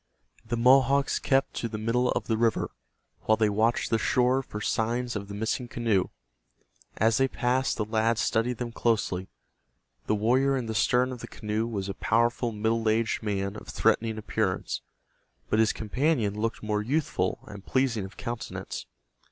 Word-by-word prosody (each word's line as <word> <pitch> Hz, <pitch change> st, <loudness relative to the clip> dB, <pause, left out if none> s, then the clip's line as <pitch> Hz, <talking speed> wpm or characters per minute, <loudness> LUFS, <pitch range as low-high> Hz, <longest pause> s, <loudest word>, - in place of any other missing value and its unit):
The 115 Hz, +1 st, -3 dB
Mohawks 135 Hz, +3 st, +4 dB
kept 135 Hz, 0 st, +1 dB
to 115 Hz, -, -1 dB
the 110 Hz, -, -4 dB
middle 120 Hz, +3 st, +1 dB
of -, -, -2 dB
the 115 Hz, -, 0 dB
river, 115 Hz, 0 st, +1 dB, 0.5 s
while 110 Hz, -, +5 dB
they 110 Hz, -1 st, +2 dB
watched 110 Hz, +3 st, +1 dB
the 115 Hz, -, +3 dB
shore 125 Hz, +2 st, +2 dB
for 105 Hz, -5 st, -7 dB
signs 120 Hz, +3 st, -1 dB
of 100 Hz, -1 st, -4 dB
the 100 Hz, -, -7 dB
missing 110 Hz, +3 st, -2 dB
canoe. 115 Hz, -6 st, +1 dB, 0.9 s
As 110 Hz, +1 st, +3 dB
they 135 Hz, -, +3 dB
passed, 130 Hz, 0 st, 0 dB
the 105 Hz, -, -1 dB
lads 110 Hz, +1 st, +1 dB
studied 115 Hz, +2 st, +1 dB
them 120 Hz, 0 st, -4 dB
closely. 100 Hz, -6 st, 0 dB, 0.8 s
The 110 Hz, -, +2 dB
warrior 130 Hz, +6 st, +2 dB
in 125 Hz, -, -3 dB
the 110 Hz, -, -3 dB
stern 125 Hz, +3 st, +2 dB
of 125 Hz, -, -6 dB
the -, -, -7 dB
canoe 110 Hz, +1 st, -2 dB
was 100 Hz, -4 st, -3 dB
a 100 Hz, -, -3 dB
powerful 120 Hz, +3 st, +1 dB
middle 110 Hz, +1 st, 0 dB
aged 115 Hz, +1 st, +1 dB
man 100 Hz, -2 st, -2 dB
of 105 Hz, -, -10 dB
threatening 110 Hz, -1 st, +1 dB
appearance, 105 Hz, -3 st, -2 dB, 0.7 s
but 110 Hz, -, +3 dB
his 110 Hz, 0 st, +4 dB
companion 115 Hz, -1 st, 0 dB
looked 110 Hz, +2 st, -3 dB
more 105 Hz, -1 st, 0 dB
youthful 115 Hz, -, -1 dB
and 105 Hz, -2 st, -10 dB
pleasing 130 Hz, -5 st, 0 dB
of 95 Hz, +2 st, -10 dB
countenance. 120 Hz, -1 st, -5 dB
115 Hz, 170 wpm, -27 LUFS, 105-125 Hz, 0.9 s, while